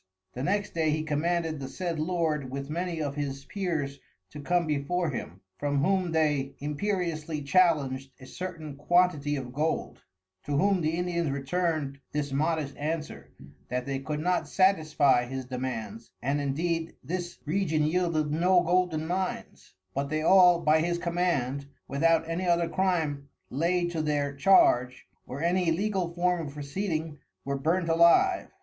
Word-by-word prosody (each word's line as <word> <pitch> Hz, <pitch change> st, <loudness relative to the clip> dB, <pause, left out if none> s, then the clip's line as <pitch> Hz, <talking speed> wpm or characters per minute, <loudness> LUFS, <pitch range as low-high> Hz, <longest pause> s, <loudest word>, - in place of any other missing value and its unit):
The 125 Hz, -, -5 dB
next 200 Hz, +8 st, -1 dB
day 160 Hz, -2 st, +1 dB
he 155 Hz, +1 st, 0 dB
commanded 160 Hz, +1 st, -1 dB
the 135 Hz, -, -5 dB
said 170 Hz, +2 st, -4 dB
Lord 155 Hz, -4 st, -1 dB
with 140 Hz, +2 st, -5 dB
many 170 Hz, 0 st, -2 dB
of 140 Hz, -1 st, -2 dB
his 140 Hz, -1 st, -4 dB
Peers 160 Hz, -8 st, -3 dB, 0.3 s
to 150 Hz, -, -8 dB
come 175 Hz, +4 st, +1 dB
before 155 Hz, +3 st, -1 dB
him, 95 Hz, -7 st, -6 dB, 0.2 s
from 145 Hz, -1 st, 0 dB
whom 185 Hz, -1 st, +1 dB
they 150 Hz, -4 st, +1 dB
imperiously 155 Hz, -1 st, -2 dB
challenged 140 Hz, -5 st, +2 dB
a 130 Hz, -, -11 dB
certain 160 Hz, -2 st, -7 dB
quantity 155 Hz, -2 st, +2 dB
of 130 Hz, -3 st, -6 dB
Gold; 155 Hz, +4 st, -2 dB, 0.4 s
to 145 Hz, -1 st, -1 dB
whom 195 Hz, +3 st, +3 dB
the 160 Hz, +1 st, 0 dB
Indians 175 Hz, -3 st, -1 dB
return'd 140 Hz, 0 st, -1 dB
this 145 Hz, -1 st, -2 dB
modest 150 Hz, 0 st, -1 dB
Answer, 155 Hz, +1 st, -4 dB, 0.4 s
that 125 Hz, 0 st, -2 dB
they 135 Hz, -1 st, -2 dB
could 150 Hz, +2 st, -4 dB
not 180 Hz, +3 st, 0 dB
satisfie 155 Hz, -9 st, +3 dB
his 130 Hz, 0 st, -5 dB
Demands, 120 Hz, -4 st, -5 dB
and 140 Hz, +3 st, -1 dB
indeed 165 Hz, +4 st, -1 dB
this 175 Hz, 0 st, -4 dB
Region 155 Hz, -2 st, +1 dB
yeilded 155 Hz, -2 st, +1 dB
no 175 Hz, +3 st, +4 dB
Golden 175 Hz, -2 st, +1 dB
Mines; 185 Hz, -, -4 dB, 0.2 s
but 140 Hz, +1 st, -2 dB
they 155 Hz, +1 st, -1 dB
all, 180 Hz, -1 st, +6 dB
by 155 Hz, 0 st, +4 dB
his 170 Hz, +1 st, 0 dB
command, 170 Hz, -6 st, -1 dB, 0.2 s
without 160 Hz, +3 st, +2 dB
any 170 Hz, +3 st, -2 dB
other 170 Hz, -1 st, +3 dB
Crime 160 Hz, -6 st, -1 dB, 0.2 s
laid 175 Hz, +5 st, +1 dB
to 165 Hz, -2 st, -1 dB
their 145 Hz, -2 st, 0 dB
Charge, 125 Hz, -6 st, +4 dB, 0.2 s
or 140 Hz, +5 st, -5 dB
any 175 Hz, 0 st, +2 dB
Legal 185 Hz, 0 st, 0 dB
Form 175 Hz, -2 st, +1 dB
of 140 Hz, -, -9 dB
Proceeding 155 Hz, 0 st, -3 dB, 0.3 s
were 140 Hz, 0 st, -1 dB
burnt 165 Hz, +6 st, 0 dB
alive. 170 Hz, -, +4 dB
155 Hz, 155 wpm, -28 LUFS, 140-175 Hz, 0.4 s, all